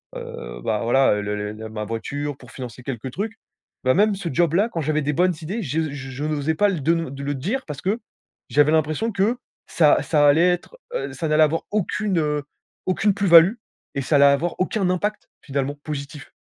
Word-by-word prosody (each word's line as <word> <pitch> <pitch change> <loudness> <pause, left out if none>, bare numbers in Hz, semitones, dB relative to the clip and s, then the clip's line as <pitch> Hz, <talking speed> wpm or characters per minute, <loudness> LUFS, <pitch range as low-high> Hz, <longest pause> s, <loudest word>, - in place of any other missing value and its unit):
heu, - - -4
heu, - - -8
bah, 105 - 0
voilà, 125 0 +4
heu, 105 - -2
le 105 0 -2
le 105 0 -4
le 110 +1 -8
ma 110 -1 -5
voiture, 140 +6 -4
pour - - -15
financer 125 -2 -8
quelques 125 0 -5
trucs. 220 - -4 0.5
Bah, 130 0 +4
même 210 +1 +3
ce 185 -3 -4
job-là, 175 - +2
quand 170 - -4
j'avais 155 +1 0
des 150 - 0
bonnes 180 +4 +3
idées, 200 +9 -3
je 155 0 -1
je 135 0 -6
n'osais 155 +1 -1
pas 205 +5 +3
l 175 -7 -2
de 165 +4 +3
le 165 -5 -2
de 140 0 -7
le 145 0 -2
dire 210 - -2
parce 145 -3 -7
que 205 +5 0 0.5
j'avais 145 +1 +4
l'impression 155 +8 +1
que 210 +5 +1 0.3
ça 155 -3 +4
ça 150 -2 +3
allait 160 +5 +5
être, 180 - -3 0.2
heu, - - -3
ça 165 - -3
n'allait 155 0 +4
avoir 160 +2 +1
aucune, 205 -2 0
heu, 150 -2 0 0.4
aucune 195 +2 +2
plus 200 0 -1
value 170 +5 +8 0.4
et 140 - 0
ça 140 +3 +1
allait 140 - +6
avoir 140 +5 +3
aucun 190 0 0
impact, 205 +4 -2
finalement, 140 0 -2
positif. 145 -1 -6
155 Hz, 215 wpm, -23 LUFS, 140-185 Hz, 0.5 s, value